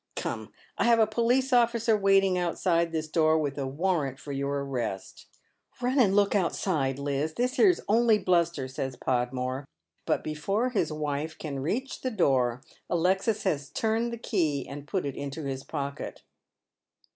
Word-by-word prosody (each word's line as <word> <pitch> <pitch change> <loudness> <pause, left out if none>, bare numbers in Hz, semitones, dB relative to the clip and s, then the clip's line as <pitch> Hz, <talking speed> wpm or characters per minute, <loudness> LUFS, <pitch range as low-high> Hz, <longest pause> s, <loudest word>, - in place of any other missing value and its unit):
Come, - - -4 0.3
I - - +3
have 235 -1 +5
a 220 - +5
police 240 +5 +1
ol'ticer 235 -2 +3
waiting 195 -2 +4
outsido 170 -1 +1
this 160 -1 -2
door 155 0 +3
with 145 -2 -2
a 135 - -2
warrant 145 -2 -1
for 140 +2 -8
your 140 0 -2
arrest." 120 -8 -4 0.5
"liunand 245 -5 +3
look 205 -1 +3
outside, 165 -8 0
Liz; 145 +2 -2
this 250 +2 -1
here's 365 -4 +5
only 225 +1 +4
bluster," 170 -7 +1
says 130 0 -4
Podmore; 130 +2 -2 0.4
but - - +1
before 195 +11 -1
his 185 -9 0
wife 150 +1 -3
can 140 -3 -5
reach 235 - -3
the 260 - -1
door 130 - +1 0.3
Alexis 190 +5 +1
has 145 -8 -1
turned 225 +1 0
the 235 - -4
key 160 - -1
and 145 +1 -8
put 185 +1 -1
it 140 - -3
into 145 +3 -5
his 135 -1 -4
pocket. 140 -2 -5
165 Hz, 155 wpm, -28 LUFS, 140-215 Hz, 0.5 s, have